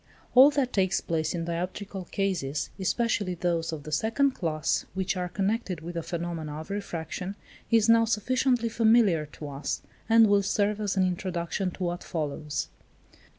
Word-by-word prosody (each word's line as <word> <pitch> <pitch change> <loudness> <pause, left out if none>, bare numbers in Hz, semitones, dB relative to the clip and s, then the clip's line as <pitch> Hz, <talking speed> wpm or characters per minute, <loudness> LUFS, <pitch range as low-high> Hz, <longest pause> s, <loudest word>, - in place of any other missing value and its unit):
All 260 +3 +9
that 275 -3 0
takes 190 -1 +2
place 160 0 -1
in 165 -1 -2
dioptrical 180 +2 -4
cases, 175 -8 -1
especially 200 -1 0
those 170 -1 -1
of 155 -3 -6
the 155 - -8
second 225 - +2
class 160 -10 -1
which 190 +1 -1
are 180 -1 -2
connected 195 -2 -1
with 170 +2 -6
the 170 - -2
phenomena 165 -2 -4
of 160 +5 -8
refraction, 185 -1 -4 0.3
is 225 -2 +4
now 230 0 +6
sufficiently 245 +2 +1
familiar 220 -8 +3
to 150 0 -8
us, 140 +1 -4 0.3
and 225 0 +7
will 205 -1 +4
serve 205 +1 0
as 200 -2 -1
an 190 - +4
introduction 180 0 -2
to 180 - -6
what 175 0 -2
follows. 150 -2 -3
185 Hz, 160 wpm, -27 LUFS, 165-215 Hz, 0.3 s, All